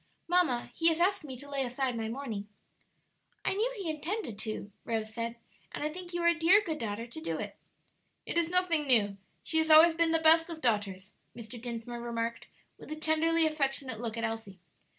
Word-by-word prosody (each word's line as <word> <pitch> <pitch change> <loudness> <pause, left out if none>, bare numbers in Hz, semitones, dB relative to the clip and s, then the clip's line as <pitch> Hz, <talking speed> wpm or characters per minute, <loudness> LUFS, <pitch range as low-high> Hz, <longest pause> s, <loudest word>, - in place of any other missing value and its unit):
Mamma, 335 -9 +2
he 330 - +1
has 330 0 +3
asked 385 +1 +2
me 265 -4 -7
to 285 - -10
lay 280 -1 -1
aside 255 0 -1
my 225 -1 -3
mourning." 225 -5 -5 1.0
"I - - +2
knew 440 +5 0
he 390 -4 -5
intended 310 - -3
to," 215 -2 -5
Rose 220 -1 -3
said, 230 0 -3 0.4
"and - - -5
I 305 0 -2
think 355 0 -8
you 345 -1 -2
are - - +4
a 340 - +6
dear 335 +5 +5
good 325 -7 -4
daughter 220 +1 -3
to 240 +7 -9
do 325 - -2
it." - - -6 0.7
"It - - -5
is 335 -1 +2
nothing 345 -4 +2
new; 205 -6 +3 0.3
she 320 - 0
has 320 0 +1
always 320 +2 +9
been 330 0 +2
the 325 - +4
best 325 +1 +5
of 330 -2 -6
daughters," 205 -6 -1 0.2
Mr. 230 0 -9
Dinsmore 235 0 -5
remarked, 235 -1 -3 0.3
with - - -11
a - - -2
tenderly 320 +1 +2
affectionate 275 -6 -1
look 230 -1 -4
at 230 - -3
Elsie. 225 -4 -4
280 Hz, 205 wpm, -30 LUFS, 230-330 Hz, 1.0 s, always